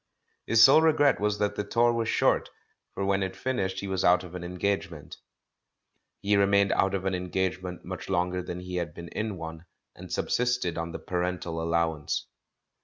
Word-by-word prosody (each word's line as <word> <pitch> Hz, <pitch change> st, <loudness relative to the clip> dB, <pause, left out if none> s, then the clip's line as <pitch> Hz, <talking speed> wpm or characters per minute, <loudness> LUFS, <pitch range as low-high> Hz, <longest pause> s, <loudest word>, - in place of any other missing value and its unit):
His 110 Hz, -1 st, +6 dB
sole 140 Hz, +6 st, +8 dB
regret 150 Hz, -4 st, +4 dB
was 105 Hz, 0 st, 0 dB
that 105 Hz, -1 st, 0 dB
the 105 Hz, -, -2 dB
tour 120 Hz, +3 st, +2 dB
was 115 Hz, -1 st, -1 dB
short,. -, -, +2 dB, 0.5 s
for 100 Hz, -, -2 dB
when 100 Hz, 0 st, +1 dB
it 95 Hz, -1 st, -3 dB
finished 100 Hz, -7 st, -2 dB
he 100 Hz, -, -5 dB
was 95 Hz, -1 st, -1 dB
out 90 Hz, +1 st, +4 dB
of 90 Hz, -1 st, -11 dB
an 90 Hz, -1 st, -6 dB
engagement. 90 Hz, -3 st, -3 dB, 1.0 s
He 105 Hz, +1 st, +2 dB
remained 100 Hz, 0 st, +3 dB
out 95 Hz, 0 st, +2 dB
of 95 Hz, 0 st, -3 dB
an 95 Hz, -, 0 dB
engagement 90 Hz, 0 st, -3 dB
much 95 Hz, +2 st, -7 dB
longer 90 Hz, -1 st, 0 dB
than 90 Hz, 0 st, -6 dB
he 90 Hz, 0 st, -5 dB
had 85 Hz, -3 st, -3 dB
been 85 Hz, 0 st, -8 dB
in 105 Hz, -2 st, -3 dB
one, 80 Hz, 0 st, -8 dB, 0.3 s
and -, -, -11 dB
subsisted 125 Hz, -8 st, 0 dB
on 85 Hz, 0 st, -4 dB
the -, -, -5 dB
parental 90 Hz, -2 st, -3 dB
allowance. 80 Hz, -2 st, -1 dB
95 Hz, 180 wpm, -27 LUFS, 90-100 Hz, 1.0 s, sole